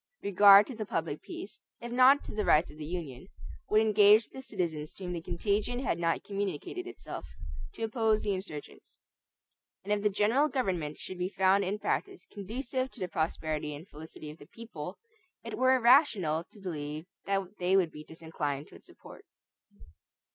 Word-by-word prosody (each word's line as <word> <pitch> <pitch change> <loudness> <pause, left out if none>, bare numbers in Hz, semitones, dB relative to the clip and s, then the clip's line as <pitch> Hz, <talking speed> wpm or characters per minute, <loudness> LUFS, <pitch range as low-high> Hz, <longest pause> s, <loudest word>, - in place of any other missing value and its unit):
Regard 200 +1 +8
to 255 - -8
the 215 -2 -5
public 160 -5 -3
peace, 200 - -9 0.2
if 240 0 -7
not 255 +3 +6
to - - -8
the 210 - -1
rights 155 -3 +3
of 150 - -15
the 150 - -5
Union, 165 -4 -6 0.4
would 215 +1 +5
engage 215 0 +6
the 265 - -9
citizens 165 - -4
to 195 - -10
whom 180 -1 -3
the 170 - -4
contagion 205 +7 -1
had 250 -9 -1
not 165 -1 0
communicated 200 -6 -4
itself - - -8 0.5
to - - -6
oppose 220 -1 +1
the 205 - 0
insurgents; 185 -6 -8 0.8
and 205 +2 0
if 205 - 0
the 210 - +3
general 220 +9 +2
government 180 - -2
should 185 - -8
be 180 +1 -1
found 195 0 +3
in 195 +2 -2
practice 390 - -3
conducive 255 +6 -4
to 255 - -15
the 185 - -2
prosperity 155 -2 -2
and 155 +6 -11
felicity 155 0 -10
of 155 - -15
the 145 - -14
people, 185 -5 -8 0.5
it - - -5
were 260 0 +4
irrational 230 - +4
to 210 - -16
believe 155 -4 -5 0.2
that 195 0 -2
they 185 +2 +3
would 175 -4 +2
be 150 - -10
disinclined 150 -3 -4
to - - -19
its - - -16
support. - - -14
195 Hz, 180 wpm, -30 LUFS, 160-215 Hz, 0.8 s, Regard